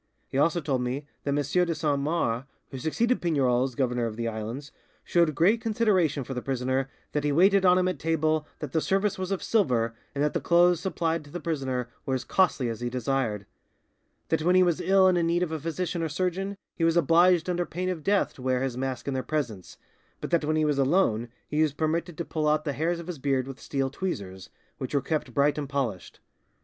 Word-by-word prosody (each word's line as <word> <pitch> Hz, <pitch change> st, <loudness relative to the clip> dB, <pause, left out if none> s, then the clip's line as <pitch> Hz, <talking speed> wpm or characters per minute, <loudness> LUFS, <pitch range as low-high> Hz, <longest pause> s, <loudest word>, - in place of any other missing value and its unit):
He -, -, -3 dB
also 170 Hz, +3 st, +2 dB
told 135 Hz, -4 st, -1 dB
me 130 Hz, +4 st, -3 dB, 0.2 s
that -, -, -1 dB
M. 140 Hz, -, +1 dB, 0.3 s
de 170 Hz, -1 st, -2 dB
Saint 150 Hz, -2 st, 0 dB
Mars, 140 Hz, -5 st, -1 dB, 0.3 s
who 135 Hz, -, -6 dB
succeeded 235 Hz, -, 0 dB
Pignerol 130 Hz, -7 st, +2 dB
as 130 Hz, -3 st, -6 dB
governor 125 Hz, -2 st, 0 dB
of 110 Hz, -, -6 dB
the 115 Hz, +1 st, -3 dB
islands, 115 Hz, +6 st, -5 dB, 0.3 s
showed 170 Hz, -4 st, +2 dB
great 205 Hz, -, +3 dB
consideration 200 Hz, -, +1 dB
for 135 Hz, -, -6 dB
the 125 Hz, -, -3 dB
prisoner, 130 Hz, +1 st, -1 dB, 0.2 s
that 150 Hz, -, -1 dB
he 145 Hz, -, +1 dB
waited 190 Hz, +5 st, +4 dB
on 180 Hz, 0 st, +6 dB
him 185 Hz, 0 st, +2 dB
at 185 Hz, -, -2 dB
table, 155 Hz, -1 st, 0 dB
that 150 Hz, -4 st, -5 dB
the 160 Hz, -, +1 dB
service 195 Hz, +2 st, 0 dB
was 185 Hz, -1 st, -3 dB
of 195 Hz, -2 st, -2 dB
silver, 125 Hz, -, +1 dB, 0.2 s
and 140 Hz, -, 0 dB
that 150 Hz, -, +1 dB
the -, -, -1 dB
clothes 175 Hz, 0 st, +4 dB
supplied 165 Hz, -3 st, -1 dB
to 145 Hz, -, -15 dB
the 175 Hz, -, -5 dB
prisoner 135 Hz, -7 st, -2 dB, 0.2 s
were 135 Hz, -, -1 dB
as 130 Hz, -, -3 dB
costly 180 Hz, -9 st, +2 dB
as 115 Hz, -2 st, -4 dB
he 120 Hz, -, -1 dB
desired; 120 Hz, -4 st, -1 dB, 0.8 s
that 160 Hz, -, +1 dB
when 180 Hz, +3 st, +3 dB
he 185 Hz, -, +6 dB
was 175 Hz, -3 st, +1 dB
ill 190 Hz, 0 st, +4 dB
and 180 Hz, -1 st, +3 dB
in 165 Hz, -, +1 dB
need 175 Hz, +1 st, +2 dB
of 170 Hz, -, -3 dB
a 160 Hz, -, -2 dB
physician 170 Hz, +3 st, -3 dB
or 165 Hz, -, -1 dB
surgeon, 185 Hz, +4 st, -2 dB, 0.2 s
he 165 Hz, -, -3 dB
was 165 Hz, +1 st, +3 dB
obliged 170 Hz, +2 st, +4 dB
under 175 Hz, -1 st, 0 dB
pain 180 Hz, +2 st, -4 dB
of 180 Hz, -4 st, -3 dB
death 200 Hz, +3 st, +2 dB
to -, -, -13 dB
wear 130 Hz, 0 st, 0 dB
his 130 Hz, -3 st, -2 dB
mask 130 Hz, -1 st, -4 dB
in 140 Hz, -, -1 dB
their 130 Hz, -, -1 dB
presence, 125 Hz, -, -4 dB, 0.4 s
but -, -, -6 dB
that 170 Hz, -2 st, +2 dB
when 155 Hz, +1 st, 0 dB
he 155 Hz, 0 st, +2 dB
was 145 Hz, -2 st, +1 dB
alone 130 Hz, -, +2 dB, 0.2 s
he 150 Hz, +1 st, 0 dB
was 155 Hz, -3 st, +2 dB
permitted 160 Hz, +2 st, -2 dB
to 170 Hz, -, -3 dB
pull 155 Hz, -1 st, -1 dB
out 155 Hz, +1 st, +2 dB
the 145 Hz, -, -1 dB
hairs 165 Hz, +4 st, -1 dB
of 170 Hz, -, -7 dB
his 175 Hz, -4 st, -6 dB
beard 135 Hz, -2 st, 0 dB
with 135 Hz, -1 st, -9 dB
steel 135 Hz, -2 st, -2 dB
tweezers, 100 Hz, -, -5 dB, 0.3 s
which 130 Hz, +2 st, -4 dB
were -, -, +4 dB
kept 150 Hz, -2 st, -2 dB
bright 145 Hz, +4 st, +2 dB
and 145 Hz, -2 st, -5 dB
polished. 125 Hz, -10 st, -3 dB
150 Hz, 230 wpm, -27 LUFS, 130-175 Hz, 0.8 s, on